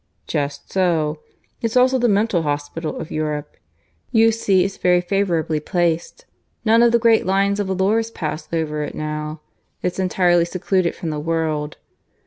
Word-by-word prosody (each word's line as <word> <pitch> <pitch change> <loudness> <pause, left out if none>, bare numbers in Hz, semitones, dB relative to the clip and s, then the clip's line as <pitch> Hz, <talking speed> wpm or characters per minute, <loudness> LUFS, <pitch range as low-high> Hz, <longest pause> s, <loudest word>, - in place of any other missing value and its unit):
"Just 140 -1 -3
so. 160 -5 +1 0.4
It's 230 0 0
also 255 +1 +4
the 240 -1 +2
mental 205 -3 +2
hospital 145 +2 -3
of 160 - -7
Europe. 150 -1 -3 0.6
You 225 0 +5
see 195 -5 +2
it's 195 0 -4
very 180 -1 +3
favourably 175 -4 0
placed. 170 - -1 0.4
None 225 +1 +5
of 235 0 +5
the 235 - +5
great 230 -1 +4
lines 200 +1 +2
of 205 - -1
volors 200 +4 +1
pass 155 -5 -5
over 155 -2 -1
it 150 - -5
now. 150 0 -4 0.4
It's 180 +1 -2
entirely 180 -2 +3
secluded 185 0 0
from 165 - -4
the 150 - -3
world. 155 -1 -2
175 Hz, 155 wpm, -21 LUFS, 155-200 Hz, 0.6 s, You